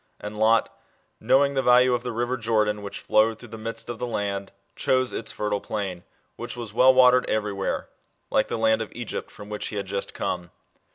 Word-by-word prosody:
And 105 0 -7
Lot, 110 +1 +3 0.4
knowing 140 +1 +3
the 135 - +1
value 125 0 +5
of 120 - 0
the 125 - -4
river 120 +2 -1
Jordan 110 -3 0
which 100 0 -7
flowed 110 +1 +3
through 120 - -13
the 115 - -8
midst 115 +1 -5
of 120 -1 -6
the 125 - -2
land, 100 -3 -3 0.2
chose 130 -1 +1
its 115 - -3
fertile 105 -1 -2
plain, 95 -5 -4 0.3
which 120 +1 -6
was 115 -4 -6
well 130 +3 +7
watered 125 -1 +5
every 105 -1 0
where, 100 -1 -2 0.4
like - - +2
the - - -3
land 110 0 +2
of 110 - -5
Egypt, 120 -2 -5
from 105 - -12
which 105 0 -4
he - - -6
had 100 -1 -2
just 100 +1 -4
come. 90 -1 -3
110 Hz, 210 wpm, -25 LUFS, 105-120 Hz, 0.4 s, well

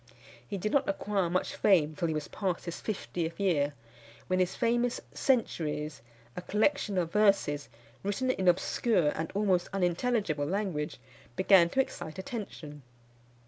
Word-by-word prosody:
He 200 - -4
did 215 +3 -2
not 280 - +2
acquire 195 -2 0
much 185 +2 -1
fame 160 -6 +3
till 170 - -1
he 160 - -1
was 155 - -3
past 185 -4 -3
his 170 - -5
fiftieth 175 -5 -3
year, 150 -7 +1 0.5
when 185 0 0
his 185 0 +1
famous 240 0 +1
Centuries, 155 - 0 0.3
a - - -4
collection 210 +1 +1
of 170 -2 -1
verses, 195 -9 +2 0.3
written 205 +6 0
in 190 -6 -2
obscure 180 0 +3
and 160 +2 -3
almost 190 -4 +2
unintelligible 180 - 0
language, 180 -5 -2 0.4
began 185 0 +6
to 265 - +3
excite 175 -9 -6
attention. 185 -8 -7
185 Hz, 140 wpm, -30 LUFS, 160-210 Hz, 0.5 s, began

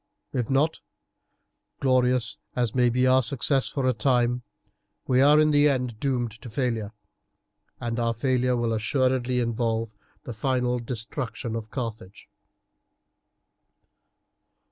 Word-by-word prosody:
If 125 -4 -2
not, 145 +4 +1 1.0
glorious 125 -2 +1 0.2
as 120 -3 0
may 125 -1 +3
be 125 +2 +1
our 130 0 +5
success 135 +2 +1
for 135 -2 -2
a 130 - +3
time, 125 +1 +1 0.6
we 130 0 +3
are 145 +2 +6
in 155 0 +4
the 145 0 +5
end 125 -5 -2
doomed 125 -4 -1
to 125 - -9
failure, 115 -3 -2 0.9
and 120 0 -3
our 115 0 0
failure 125 +1 +1
will 115 -1 0
assuredly 125 +2 +1
involve 115 -2 -1 0.3
the 120 - -6
final 125 +1 0
destruction 120 0 -4
of 110 -1 -5
Carthage. 110 -6 -6
125 Hz, 120 wpm, -25 LUFS, 115-130 Hz, 1.0 s, are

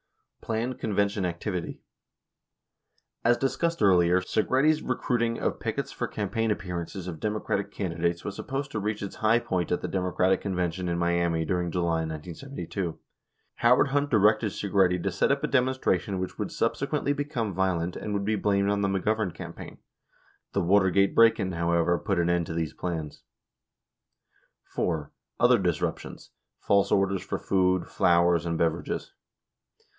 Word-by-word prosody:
22 - - -17
Planned 115 +3 -2
Convention 100 -2 0
Activity: 90 +1 -4 1.4
As 120 +1 +4
discussed 165 +4 -1
earlier, 90 -2 +5
23 100 +3 0
Segretti's 150 +4 +2
recruiting 120 -2 -1
of - - -1
pickets - - -3
for - - -3
campaign 115 +2 -2
appearances 90 -1 -4
of 80 -3 -6
Democratic 105 -1 -2
can 95 -5 -3
didates 85 +1 -1
was 100 - -4
supposed 135 +4 -4
to 110 - -2
reach 105 0 -2
its 100 - -6
high 110 +2 +3
point 90 -6 -2
at 90 - 0
the - - -3
Democratic 90 0 +1
con 100 -2 -3
vention 90 0 -1
in 85 - -1
Miami 85 -1 +1
during 90 +1 -1
July, 85 -2 0
1972. 85 - -5 0.6
Howard 125 +4 +4
Hunt 145 +1 +1
directed 110 -2 +3
Segretti 95 -3 +1
to - - -1
set - - +1
up - - 0
a - - +1
demonstration 125 -8 +1
which 95 - -4
would - - -3
subsequently 145 - 0
become 135 -8 -3
violent 90 -1 0
and 105 - -5
would 100 -1 -1
be 110 +1 +1
blamed 100 -1 +1
on 100 0 0
the 100 - +1
McGovern 100 0 0
campaign! - - -9 0.8
The 100 - +1
Watergate 95 +1 +3
break 115 0 +6
in, 95 -2 -1
however, 85 0 +1
put 100 -4 -1
an 85 0 +1
end 85 -1 +1
to - - -4
these 80 -2 -2
plans. 80 -4 -5 1.6
(iv) 80 -4 0 0.3
Other 120 -1 +5
Disruptions. 90 -4 -3
— - - -58
False 100 0 +3
Orders 95 -1 +2
for - - -3
Food, 95 -1 +1
Flowers, 85 -1 +3
and 85 -1 -1
Beverages. 85 0 -2
95 Hz, 160 wpm, -27 LUFS, 85-110 Hz, 1.6 s, break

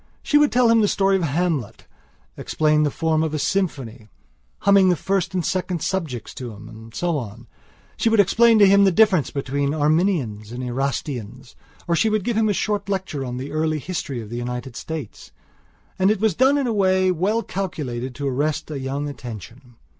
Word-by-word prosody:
She 295 - +3
would 295 -1 +3
tell 245 0 +4
him 230 -1 +5
the 210 - +3
story 195 -1 +2
of 190 - 0
Hamlet; 160 - -2 0.5
explain 155 0 +1
the 150 - +2
form 160 +1 0
of 160 -1 -1
a - - 0
symphony, 135 - -2 0.5
humming 200 -1 +5
the 180 - +3
first 190 +1 -1
and 180 -3 -1
second 180 -2 -2
subjects 160 - -3
to 120 -3 -7
him, 105 +1 -12
and 110 0 -12
so 170 +4 -1
on; 105 -5 -9 0.5
she 230 - +2
would 225 -1 +2
explain 230 +4 +5
to 205 - +7
him 200 +1 +6
the 195 - +5
difference 190 -5 +3
between 140 +1 -2
Arminians 150 - 0
and 125 +1 -5
Erastians; 125 -1 -4 0.3
or 170 - +2
she 220 +6 +2
would 215 -2 0
give 235 +2 -1
him 220 0 +2
a - - +3
short 205 0 -2
lecture 190 -8 -3
on 125 -1 -5
the 135 +3 -6
early 155 0 0
history 150 -5 -4
of 110 -1 -9
the 120 - -4
United 125 0 -5
States. 155 -7 -7 0.7
And 190 +1 +4
it 215 -1 +1
was 220 -2 +2
done 265 - +3
in 280 - 0
a 235 - 0
way 185 -2 +2
well 200 +7 0
calculated 135 -10 -4
to 140 -1 -3
arrest 150 +4 -1
a 145 - -4
young 135 +2 -3
attention. 120 -1 -9
155 Hz, 200 wpm, -22 LUFS, 130-195 Hz, 0.7 s, to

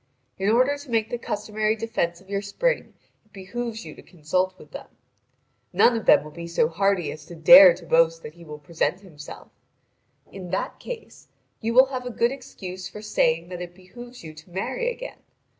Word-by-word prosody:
In 195 +2 +1
order 255 +6 +3
to 285 -2 -13
make 225 -1 0
the 240 - -3
customary 215 0 -1
defence 215 -7 -2
of 190 - -21
your 200 0 -2
spring - - -1 0.3
it 215 - -34
behoves 225 +4 -6
you - - -9
to - - -14
consult 185 +3 -2
with - - -16
them. - - -9 0.9
None 240 - +5
of 225 - -4
them - - +6
will 155 - -11
be 170 +2 -8
so 170 -2 +1
hardy 190 0 0
as 155 - -10
to 175 - -10
dare 170 +3 +9
to 175 -1 -13
boast 165 0 +3
that 150 - -9
he 170 0 -15
will 150 -2 -9
present 170 +5 -2
himself. 155 -7 -12 0.8
In 185 -2 -9
that 190 - -3
case 475 -2 -9 0.3
you 230 +1 -2
will 260 +1 +8
have 250 -1 -4
a - - -3
good 235 0 +1
excuse 185 -9 -8
for 210 - -10
saving 165 -5 +1
that 180 -1 -7
it 175 0 -8
behoves 240 +6 -13
you 160 -1 -9
to 160 +3 -15
marry 195 - -2
again. - - -8
195 Hz, 200 wpm, -24 LUFS, 170-230 Hz, 0.9 s, dare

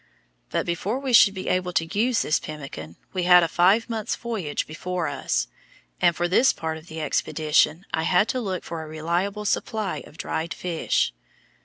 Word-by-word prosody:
But - - -1
before 180 +7 -2
we 270 -2 -3
should 200 -3 +7
be 185 - -5
able 180 -1 0
to 165 - +2
use 220 +6 +1
this 155 - +1
pemmican 135 - -8 0.2
we 185 - -1
had 180 0 +7
a - - +2
five 190 +7 +3
months' 225 -3 -2
voyage 210 -11 -3
before 175 +2 -3
us, - - -1 0.5
and 170 - +4
for 175 +1 0
this 240 +9 +4
part 160 -1 -4
of 160 - -18
the 160 0 -7
expedition 155 +2 +1
I 160 - +1
had 180 +5 +3
to 255 - -1
look 190 -5 -3
for 165 -1 -5
a 160 - -8
reliable 175 +7 -2
supply 215 0 -1
of 155 - -17
dried 165 +1 -3
fish. 170 -3 0
175 Hz, 185 wpm, -24 LUFS, 160-200 Hz, 0.5 s, should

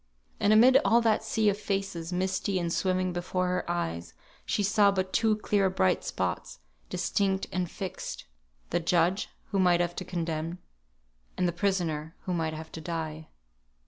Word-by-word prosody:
And 205 - +3
amid 250 +5 +7
all 235 - +5
that 220 -1 +2
sea 220 0 +1
of 205 0 -1
faces, 195 -5 -3
misty 190 +2 0
and 170 -2 -1
swimming 185 -1 0
before 180 +1 -1
her 180 -1 -2
eyes, 85 - -3 0.3
she 205 - +1
saw 205 0 +4
but 190 -1 -1
two 220 -1 +3
clear 205 -2 +1
bright 95 - +1
spots, - - -3 0.3
distinct 195 -1 0
and 180 -2 -1
fixed: 190 -1 -6 0.5
the 175 - +2
judge, 175 +3 +1 0.2
who 195 - +1
might 180 -2 +4
have 175 0 0
to - - -3
condemn; 165 -1 -3 0.8
and 180 - +2
the - - +1
prisoner, 170 -4 -1
who 185 - -3
might 160 -2 -1
have 160 +1 -8
to 160 - -7
die. 160 -2 -4
180 Hz, 165 wpm, -28 LUFS, 170-195 Hz, 0.8 s, amid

